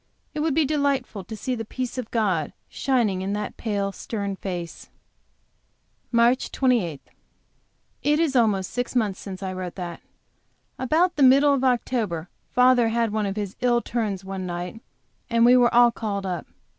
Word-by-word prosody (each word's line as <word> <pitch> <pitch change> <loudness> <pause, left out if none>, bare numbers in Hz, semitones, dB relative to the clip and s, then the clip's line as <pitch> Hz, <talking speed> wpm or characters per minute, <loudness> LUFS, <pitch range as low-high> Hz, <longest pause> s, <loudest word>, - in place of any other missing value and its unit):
It 305 - -4
would 305 -2 +1
be 320 - +3
delightful 280 -8 -1
to 220 +2 -7
see 255 +5 -2
the 225 -2 -3
peace 250 +3 -5
of 240 - -5
God 190 -9 0
shining 235 -8 0
in 195 +1 -2
that 210 0 -4
pale, 200 -3 -2
stern 200 -1 -4
face. 175 -4 -6 1.2
MARCH 235 +2 +3
28. 225 - +1 1.0
It 295 +1 +2
is 315 -5 +1
almost 210 -6 +2
six 245 +1 -3
months 210 -6 +1
since 195 -1 -7
I 190 -1 -3
wrote 185 -1 -5
that. 175 -3 -6 0.8
About 325 +7 +2
the - - 0
middle 275 +2 +6
of 270 -2 0
October 225 -9 0 0.2
father 250 -1 +4
had 230 -1 0
one 215 -2 0
of 195 - -3
his 205 -2 -4
ill 240 -1 +3
turns 210 -6 -3
one 190 -1 -5
night, 175 +5 -5 0.5
and 230 0 +4
we 245 +1 +7
were 245 -1 +5
all 240 0 +6
called 200 -4 -3
up. 180 -3 -4
225 Hz, 170 wpm, -24 LUFS, 195-255 Hz, 1.2 s, we